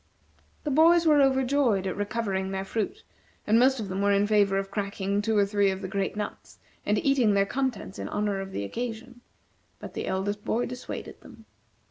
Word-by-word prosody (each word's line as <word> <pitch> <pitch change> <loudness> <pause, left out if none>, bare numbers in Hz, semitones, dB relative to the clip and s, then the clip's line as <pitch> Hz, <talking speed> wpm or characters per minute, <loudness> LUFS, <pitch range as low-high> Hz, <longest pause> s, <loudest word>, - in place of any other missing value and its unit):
The 295 - -2
boys 335 +4 +5
were 300 -2 +5
overjoyed 265 -6 +2
at 185 - -2
recovering 205 -2 -2
their 190 0 -3
fruit, 225 - -3 0.4
and 220 +2 +4
most 260 +1 +4
of 215 - -4
them 190 +1 -3
were 200 0 +3
in 200 0 +3
favor 205 -2 +3
of 195 0 -3
cracking 200 -1 -2
two 220 0 0
or 200 - +4
three 200 0 +2
of 190 +1 -4
the - - -3
great 195 +1 -2
nuts, 210 -1 -6 0.3
and - - +2
eating 255 -7 +3
their 195 0 +3
contents 245 -3 -3
in - - -4
honor 205 -1 -1
of 195 0 -7
the 100 - -3
occasion, 240 - -6 0.6
but - - -9
the - - -4
eldest 205 +2 -2
boy 240 +2 0
dissuaded 250 0 -7
them. - - -15
205 Hz, 195 wpm, -27 LUFS, 195-245 Hz, 0.6 s, boys